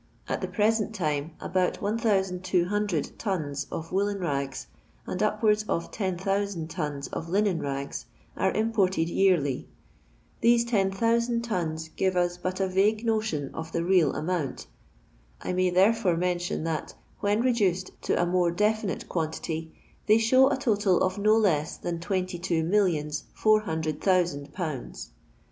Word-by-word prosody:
At - - -2
the - - -2
present 220 0 +1
time, 155 -3 -1
abont 185 -1 0
ISOO 190 - 0
tons 145 -9 -2
of 165 0 -5
woollen 200 +1 0
rags, 140 -6 -2 0.4
and - - -4
upwards 215 0 +2
of 170 - -1
10,000 195 -2 -1
tons 150 -5 -3
of 165 - -5
linen 195 -2 +1
rags, 140 0 -4 0.3
are 190 - +1
imported 195 -6 +1
yearly. 170 -8 +2 0.7
These 235 0 +4
10,000 230 +2 +1
tons 160 -7 -2
give 185 +2 0
us 175 0 +1
but 185 +1 -3
a 190 - +1
vague 210 +4 +2
notion 215 -11 -1
of 160 0 -6
the 170 - 0
real 175 -5 +3
amount. 160 -4 -2 0.7
I - - -3
may 185 0 +2
therefore 190 0 +3
mention 175 -2 -1
that, 160 -2 -3 0.2
when 205 +2 +1
reduced 200 -8 +1
to - - 0
a 175 - +3
more 175 0 +2
definite 210 +2 0
quantity, 160 -1 -3 0.4
they 215 +1 +6
show 255 +4 +5
a 280 - 0
totil 205 -7 +2
of 185 +2 0
no 215 +2 +4
less 165 -8 +1
than 170 -1 -4
twenty 185 0 -2
two 170 -2 0
millions 165 -5 +1
four 215 0 +4
hundred 160 -6 -3
thousand 175 -7 +1
pounds. 135 - -5
185 Hz, 145 wpm, -27 LUFS, 165-210 Hz, 0.7 s, they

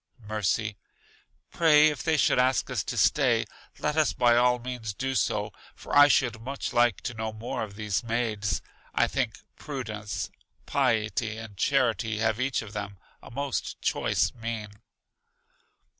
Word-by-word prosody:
Mercy: 105 0 -1 0.7
Pray, 155 -2 +6
if 145 -5 -4
they 160 -1 +1
should 135 - +3
ask 130 0 +2
us - - -1
to - - -4
stay, - - +3 0.3
let 150 0 -1
us 155 -2 +3
by 120 -1 +4
all 125 +1 +4
means 120 -4 -5
do 135 +5 -2
so; 105 -5 0 0.2
for - - -5
I 145 0 +9
should 120 -5 +2
much 135 +4 -4
like 120 -3 +3
to - - -4
know 110 -1 -3
more 110 +2 -5
of 105 -2 -5
these 105 +1 -2
maids. 110 -3 -1 0.3
I - - +4
think - - -1 0.2
Prudence, 110 -7 -5 0.3
Piety, 115 -4 0
and 115 -3 -9
Charity 115 -2 +1
have, 110 +1 +1
each 130 -2 0
of 105 -1 -11
them, 100 -2 -5 0.2
a - - -12
most 140 +2 -3
choice - - +1
mien. 115 -3 -5
115 Hz, 155 wpm, -27 LUFS, 110-130 Hz, 0.7 s, I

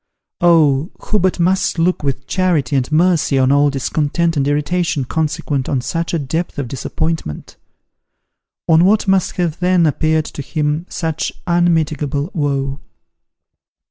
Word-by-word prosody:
Oh! 160 -3 +3
who 210 - -1
but 185 0 0
must 190 +1 +1
look 175 +2 +1
with 140 -1 -3
charity 165 -8 0
and 130 +1 0
mercy 160 -3 +2
on 130 0 +3
all 145 +1 +4
discontent 150 +4 -1
and 140 -1 0
irritation 150 0 0
consequent 145 -2 -2
on 135 - +1
such 165 +6 -3
a 170 - 0
depth 160 +4 -3
of 140 -3 -3
disappointment: 135 - -4 1.1
on 160 0 +5
what 205 +3 +3
must 190 -2 +2
have 170 -4 -2
then 180 -1 +3
appeared 155 +1 +1
to - - -7
him 150 +3 -2
such 160 -2 -2
unmitigable 160 -4 0
woe. 140 -3 -1
155 Hz, 140 wpm, -17 LUFS, 140-175 Hz, 1.1 s, on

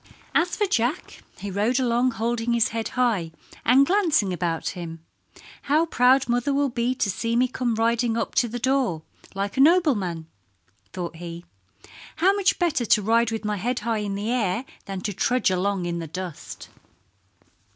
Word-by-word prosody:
As 350 +1 +2
for 420 - +1
Jack 275 - -1 0.2
he 200 - -6
rode 215 +7 +1
along 245 0 +2
holding 235 +1 -1
his 235 -2 +2
head 225 0 -3
high 215 -10 +1 0.3
and 260 +4 +5
glancing 315 - +2
about 170 -2 -2
him. 165 -2 -8 0.6
"How 305 +4 +2
proud 260 -3 +3
mother 245 +4 0
will 285 0 +2
be 240 +1 -1
to 225 - 0
see 230 +5 -2
me 250 +2 +3
come 250 -2 -2
riding 230 +1 +1
up - - -2
to 240 - -2
the 240 +2 -5
door 250 -10 0 0.3
like 200 +3 -3
a - - +4
nobleman," 260 - +3 0.7
thought 175 -3 -5
he. 170 0 -8 0.7
"How 375 +4 +3
much 400 -1 +1
better 310 - 0
to 210 - +4
ride 230 +2 +3
with 225 -1 -4
my 210 0 -1
head 240 +5 -2
in 210 -3 -1
the 210 +3 -2
air 230 -1 0 0.2
than 195 -1 -5
to 205 - -3
trudge 230 +2 +1
along 185 0 0
in 170 0 -2
the 165 - -5
dust." 180 0 -8
230 Hz, 170 wpm, -24 LUFS, 195-255 Hz, 0.7 s, and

